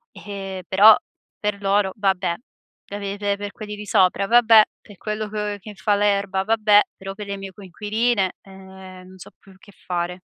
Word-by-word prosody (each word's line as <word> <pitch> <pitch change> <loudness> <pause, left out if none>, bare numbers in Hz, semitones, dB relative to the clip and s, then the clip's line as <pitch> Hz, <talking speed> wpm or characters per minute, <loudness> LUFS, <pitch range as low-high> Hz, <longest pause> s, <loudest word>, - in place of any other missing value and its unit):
Ehm, 195 -2 -7
però 205 +3 +7 0.4
per 210 -1 -3
loro: 195 -1 +1
"vabbè!" 190 -4 0 0.6
E 205 0 -6
pe 200 0 -5
pe 200 -1 -1
per 205 0 -6
quelli 210 -1 -8
di 210 0 -9
sopra: 185 0 +2
"eh, - - -7
vabbè!" 230 -2 +7 0.2
Per 205 -3 -16
quello 215 +1 -4
co 210 -1 -3
che 210 +2 -11
fa 205 +2 +1
l'erba: 200 -2 0
"vabbè!" 215 -1 +4 0.2
Però 195 0 -7
per 210 -1 -8
le 200 0 -4
mie 195 0 -8
coinquiline, 210 +1 -1
ehm, 190 -1 -13
non 185 0 -15
so 185 - -12
più 195 -1 -19
che 200 - -18
fare. 180 0 -3
200 Hz, 185 wpm, -22 LUFS, 190-210 Hz, 0.6 s, però